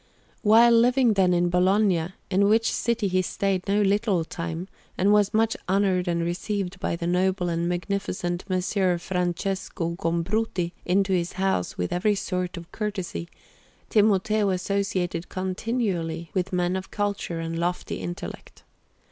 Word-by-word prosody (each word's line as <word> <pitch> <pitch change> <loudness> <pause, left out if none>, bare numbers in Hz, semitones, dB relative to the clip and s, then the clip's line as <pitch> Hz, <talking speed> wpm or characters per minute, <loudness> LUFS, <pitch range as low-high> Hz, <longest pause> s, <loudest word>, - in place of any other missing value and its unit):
While 230 +2 +6
living, 240 +1 +4
then, 190 -2 +3
in 175 0 +2
Bologna, 185 -1 +2 0.2
in 200 +2 +3
which 225 +1 +3
city 235 -3 0
he 185 0 +2
stayed 190 +1 -1
no 205 +1 +3
little 200 -3 +1
time, 165 +2 -5 0.3
and 200 +3 +4
was 205 -1 +4
much 225 +1 +2
honoured 190 -2 +2
and 170 -1 0
received 185 +2 -3
by 190 - -1
the 170 - -5
noble 180 +1 +1
and 170 +1 -1
magnificent 180 -1 -2
Messer 185 0 +1
Francesco 180 0 -2
Gombruti 175 +2 -1
into 190 +2 +2
his 175 -1 0
house 190 - -1
with 90 - -2
every 205 +4 +2
sort 180 -2 -3
of 170 0 -10
courtesy, 190 - -4 0.6
Timoteo 210 0 +3
associated 185 -2 -1
continually 185 -4 -2
with 185 0 -1
men 180 0 0
of 190 0 -5
culture 200 -5 -2
and 165 0 -3
lofty 175 +1 -2
intellect. 175 +3 -7
185 Hz, 140 wpm, -25 LUFS, 175-205 Hz, 0.6 s, While